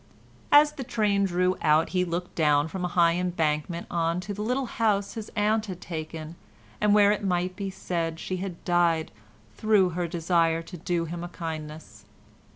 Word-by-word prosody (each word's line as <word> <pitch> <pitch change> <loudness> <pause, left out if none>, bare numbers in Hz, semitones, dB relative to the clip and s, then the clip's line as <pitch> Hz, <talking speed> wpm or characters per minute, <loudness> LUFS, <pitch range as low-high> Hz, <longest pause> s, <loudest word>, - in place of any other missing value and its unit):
As 295 +1 +7
the 275 - -6
train 210 -5 +1
drew 180 0 +1
out 155 0 +3
he 180 -1 +1
looked 175 0 -4
down 150 -2 +3
from 180 +3 -5
a - - +1
high 170 -1 +3
embankment 170 -1 -1
on 170 0 0
to 200 +3 -5
the 205 - -6
little 250 +5 0
house 210 -4 0
his 220 -2 -6
aunt 215 +1 +1
had 185 -3 -6
taken, 160 -1 -6 0.5
and 210 0 +4
where 205 -1 +6
it 210 - -1
might 180 -1 0
be 200 0 -4
said 165 -3 -3
she 185 - -3
had 180 -2 -6
died 170 -2 +2 0.5
through 210 -4 +3
her 175 0 -2
desire 165 -1 +1
to 180 - -10
do 170 0 -1
him 170 +1 -6
a - - -4
kindness. 155 - -7
175 Hz, 180 wpm, -26 LUFS, 165-200 Hz, 0.5 s, As